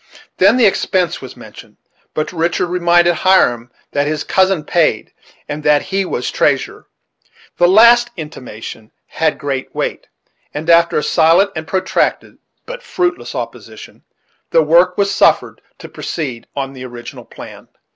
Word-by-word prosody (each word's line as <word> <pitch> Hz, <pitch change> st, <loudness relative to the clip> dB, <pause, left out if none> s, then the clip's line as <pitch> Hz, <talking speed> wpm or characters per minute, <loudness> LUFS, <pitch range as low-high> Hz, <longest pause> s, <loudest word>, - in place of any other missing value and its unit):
Then 200 Hz, +6 st, +4 dB
the 245 Hz, -, +4 dB
expense 185 Hz, -3 st, 0 dB
was 130 Hz, -, -10 dB
mentioned; -, -, -14 dB, 0.4 s
but 155 Hz, +3 st, -3 dB
Richard 170 Hz, +1 st, 0 dB
reminded 175 Hz, -1 st, +3 dB
Hiram 125 Hz, -11 st, +2 dB, 0.2 s
that 145 Hz, 0 st, 0 dB
his 150 Hz, -1 st, -2 dB
cousin 190 Hz, -4 st, +1 dB
paid, 155 Hz, -8 st, 0 dB, 0.3 s
and 150 Hz, +1 st, -5 dB
that 150 Hz, -1 st, +3 dB
he 195 Hz, 0 st, -2 dB
was 125 Hz, -, -3 dB
treasurer. -, -, -1 dB, 0.7 s
This 175 Hz, -, +5 dB
last 235 Hz, +4 st, +6 dB
intimation 120 Hz, -8 st, -9 dB
had 160 Hz, -1 st, -1 dB
great 140 Hz, -3 st, -5 dB
weight, -, -, -4 dB, 0.5 s
and 150 Hz, +2 st, -5 dB
after 170 Hz, 0 st, +4 dB
a 150 Hz, -, 0 dB
silent 170 Hz, +5 st, +3 dB
and 160 Hz, -1 st, -6 dB
protracted, 190 Hz, +2 st, -1 dB, 0.3 s
but -, -, -8 dB
fruitless 360 Hz, -6 st, -3 dB
opposition, -, -, -8 dB, 0.5 s
the 165 Hz, -, +3 dB
work 175 Hz, +4 st, +3 dB
was 200 Hz, -1 st, +1 dB
suffered -, -, +2 dB, 0.2 s
to -, -, -11 dB
proceed 130 Hz, -8 st, -6 dB
on 135 Hz, -1 st, -4 dB
the 130 Hz, -1 st, -10 dB
original 120 Hz, -1 st, -10 dB
plan. -, -, -12 dB
165 Hz, 145 wpm, -16 LUFS, 145-190 Hz, 0.7 s, last